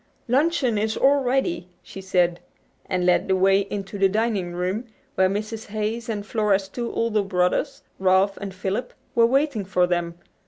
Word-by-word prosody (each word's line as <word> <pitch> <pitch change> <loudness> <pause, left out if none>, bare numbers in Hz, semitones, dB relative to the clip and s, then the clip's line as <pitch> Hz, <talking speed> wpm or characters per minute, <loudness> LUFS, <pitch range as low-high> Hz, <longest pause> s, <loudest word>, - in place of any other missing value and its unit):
"Luncheon 260 -3 +2
is 220 +1 -1
all 280 +1 +4
ready," 245 -9 0 0.2
she 195 - -9
said, 180 -2 +1 0.5
and 180 -1 0
led 180 +1 +3
the 190 - +2
way 195 +1 +4
into 200 0 -5
the 195 0 +4
dining 210 -4 0
room, 185 +6 -2 0.3
where 190 0 +3
Mrs. 215 +3 -4
Hayes 220 +3 -3
and 205 -2 -3
Flora's 205 -3 +1
two 235 +4 -4
older 230 -2 +1
brothers, 195 +8 0 0.2
Ralph 190 +1 +3
and 200 -1 -6
Philip, 190 +5 -4 0.2
were 230 -1 +5
waiting 270 -3 +1
for 185 -1 +2
them. 175 -1 -1
200 Hz, 165 wpm, -24 LUFS, 185-230 Hz, 0.5 s, were